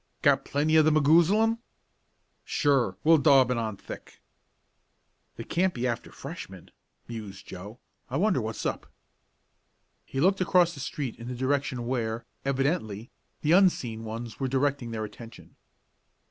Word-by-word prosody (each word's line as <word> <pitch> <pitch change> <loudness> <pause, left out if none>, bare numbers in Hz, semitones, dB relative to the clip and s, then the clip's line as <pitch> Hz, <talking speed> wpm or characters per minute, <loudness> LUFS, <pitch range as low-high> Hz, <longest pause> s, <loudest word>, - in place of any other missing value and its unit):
"Got - - +4
plenty 155 +3 +2
of 155 - +6
the 155 - +5
magoozilum?" 170 +10 +4 0.8
"Sure. 140 -5 +1
We'll 160 0 +6
daub 135 -4 +5
it 125 - 0
on 110 -3 -3
thick." - - -10 1.2
"They - - -6
can't 180 +2 0
be 120 0 -2
after 120 -2 -3
Freshmen," 135 - -9 0.4
mused 105 -4 -8
Joe. 100 +5 -9 0.3
"I 130 - -2
wonder 195 - +2
what's 110 0 -5
up?" - - -2 1.2
He 135 - -5
looked 190 +5 +3
across 180 -1 +4
the 140 - -10
street 135 -1 -4
in 115 - -9
the 125 - -4
direction 130 -1 -1
where, 115 -2 -2 0.2
evidently, 135 - -1 0.3
the 150 - +2
unseen 150 - +3
ones 115 +1 -6
were 135 - 0
directing 135 -1 0
their 110 -1 -3
attention. 115 +1 -12
135 Hz, 145 wpm, -27 LUFS, 115-155 Hz, 1.2 s, of